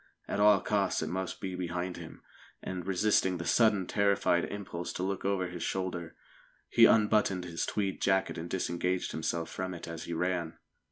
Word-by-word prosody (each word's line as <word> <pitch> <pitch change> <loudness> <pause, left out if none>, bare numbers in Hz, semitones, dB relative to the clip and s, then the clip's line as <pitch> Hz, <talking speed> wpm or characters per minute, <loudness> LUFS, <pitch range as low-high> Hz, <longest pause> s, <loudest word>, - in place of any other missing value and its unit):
At - - -2
all 105 -2 +6
costs 100 -5 0
it 80 - -3
must 95 +1 -3
be 95 -1 -4
behind 90 0 -3
him, - - -10 0.4
and, 90 -1 -5
resisting 95 -1 +2
the 85 - -5
sudden 105 -5 +3
terrified 100 -3 +2
impulse 90 -4 -5
to 90 - -3
look 95 +1 -2
over 100 -2 +1
his 90 -1 -7
shoulder, 90 -3 -3 0.5
he - - +7
unbuttoned 105 -4 +3
his 85 -1 -3
tweed 100 -2 -2
jacket 95 0 +2
and 85 +1 -6
disengaged 90 0 -1
himself 80 +1 -2
from 95 -1 -4
it 85 - -8
as 85 -1 -6
he 85 - -4
ran. 85 -1 -1
95 Hz, 175 wpm, -31 LUFS, 85-100 Hz, 0.5 s, he